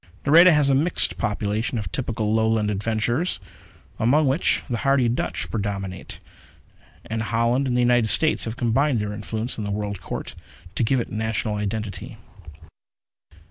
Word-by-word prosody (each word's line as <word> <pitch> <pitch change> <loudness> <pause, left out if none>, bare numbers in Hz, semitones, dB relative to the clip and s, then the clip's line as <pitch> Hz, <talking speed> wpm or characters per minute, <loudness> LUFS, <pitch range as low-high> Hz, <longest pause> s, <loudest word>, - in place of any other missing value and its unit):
Nareda 170 +5 +7
has 150 -3 +3
a 140 - +3
mixed 155 +6 +1
population 105 +3 -2
of 100 -5 -4
typical 115 -4 -2
Lowland 110 -1 +1
adventures, 110 - -1 0.6
among 140 +7 +3
which 135 +6 +1
the 120 -4 -2
hardy 135 -3 +2
Dutch 115 - -2
predominate; 100 -3 -4 0.9
and 110 0 -3
Holland 115 +4 +1
and 125 - 0
the - - +3
United 120 -2 +3
States 155 +9 +4
have 115 +1 -5
combined 130 +3 +1
their 105 -1 -3
influence 110 +3 -4
in - - -3
the 100 - -4
World 100 -2 -3
Court - - -6 0.4
to - - 0
give 130 +3 +2
it 120 - -4
national 110 0 -2
identity. 105 -1 -4
115 Hz, 150 wpm, -23 LUFS, 105-130 Hz, 0.9 s, Nareda